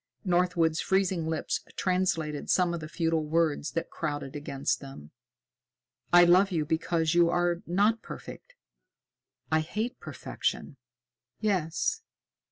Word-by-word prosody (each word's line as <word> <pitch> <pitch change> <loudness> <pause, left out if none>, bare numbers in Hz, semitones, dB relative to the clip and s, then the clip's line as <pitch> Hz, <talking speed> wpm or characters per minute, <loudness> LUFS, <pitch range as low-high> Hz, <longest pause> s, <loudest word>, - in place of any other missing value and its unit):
Northwood's 175 -3 +2
freezing 190 -4 +1
lips 160 -1 -1 0.2
translated 170 -5 -1
some 180 -2 +3
of 170 - -3
the 155 - -7
futile 165 -1 0
words 155 -1 0
that 165 - -3
crowded 145 -3 -4
against 140 -2 -2
them. 135 - -11 1.0
"I 175 0 +8
love 180 +3 +5
you 160 -4 0
because 160 +1 0
you 170 -1 +5
are 175 0 +1
not 205 +6 +2
perfect. - - -10 1.0
I 160 - +4
hate 215 +10 -3
perfection!" - - -4 0.6
"Yes. 200 - 0
170 Hz, 120 wpm, -28 LUFS, 155-180 Hz, 1.0 s, I